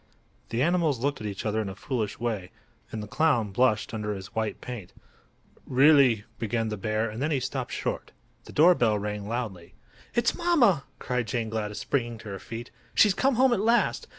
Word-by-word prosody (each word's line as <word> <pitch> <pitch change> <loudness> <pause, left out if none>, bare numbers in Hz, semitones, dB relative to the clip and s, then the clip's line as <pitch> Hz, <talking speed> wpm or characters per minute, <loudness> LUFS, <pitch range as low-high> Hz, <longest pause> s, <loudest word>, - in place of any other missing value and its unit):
The 120 +3 0
animals 170 -4 +2
looked 140 +3 -2
at 105 - -3
each 100 0 -5
other 110 +1 0
in 105 - -4
a 95 - -7
foolish 110 -2 -3
way, 110 -6 -2 0.4
and 110 -1 -4
the - - -7
clown 120 -6 +1
blushed 110 +1 +1
under 105 -1 -2
his 95 0 -9
white 110 -1 -2
paint. 120 -8 -8 0.7
"Really—" 130 -5 +5 0.2
began 115 0 -1
the 105 - -2
bear, 110 +2 -1
and 110 +3 -6
then 150 - +1
he 145 -4 +1
stopped - - -4
short. - - -3 0.3
The - - -11
door 170 +4 +6
bell 115 -9 +2
rang 105 0 -4
loudly. 105 -7 -5 0.4
"It's 235 -1 +2
mamma!" 260 - +3
cried 125 -2 -2
Jane 115 -3 -2
Gladys, 105 -2 -3
springing 120 -4 -1
to 110 - -10
her 100 -1 -5
feet. 115 +4 -8 0.2
"She's 210 -3 +6
come 265 +6 +2
home 255 +1 +4
at 225 - +1
last. 230 +3 +2
115 Hz, 195 wpm, -27 LUFS, 105-145 Hz, 0.7 s, door